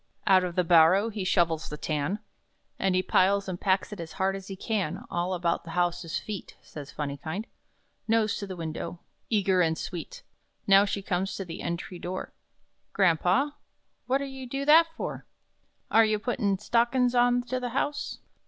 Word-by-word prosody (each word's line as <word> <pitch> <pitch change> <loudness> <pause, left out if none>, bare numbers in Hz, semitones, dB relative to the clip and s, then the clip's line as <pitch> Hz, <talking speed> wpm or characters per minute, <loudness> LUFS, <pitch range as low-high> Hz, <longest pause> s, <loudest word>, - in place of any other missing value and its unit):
Out 190 -2 +5
of 175 -1 -3
the 180 - +3
barrow 175 +5 +5
he 205 -2 -4
shovels 170 -3 +1
the 150 - -6
tan, 155 +6 -1 0.6
And 190 -1 +1
he 185 - +2
piles 195 +2 +3
and 180 -2 -5
packs 190 +1 +1
it 205 - -9
as 165 -1 -7
hard 195 0 0
as 195 -1 -8
he 195 - -6
can 195 -5 -2
"All 175 +2 -1
about 170 -1 0
the 170 - -11
house's 175 -2 0
feet," 210 -4 -7
Says 145 -2 -10
"Phunny 145 -1 -4
kind," 175 +8 -4 0.6
Nose 225 -1 +2
to 200 - -5
the 190 - -6
window, 170 +1 -5 0.3
Eager 195 -4 +3
and 160 -2 +1
sweet. 340 - -6 0.4
Now 195 0 +6
she 200 -1 -3
comes 190 +1 -1
to 195 - -5
the 165 - -7
entry 170 +1 -4
door: 185 +2 -5 0.6
"Grampa 190 - +2 0.5
what 270 +2 +1
are - - -3
you 265 -2 -8
do 275 +2 -3
that 320 +3 +7
for? - - -5 0.6
Are 225 - +7
you 215 -1 +2
puttin' 210 -3 0
stockin's 240 +4 +2
on 245 0 +3
to 255 +1 -3
the 250 -1 -3
house?" 290 +4 -2
195 Hz, 180 wpm, -28 LUFS, 175-225 Hz, 0.6 s, that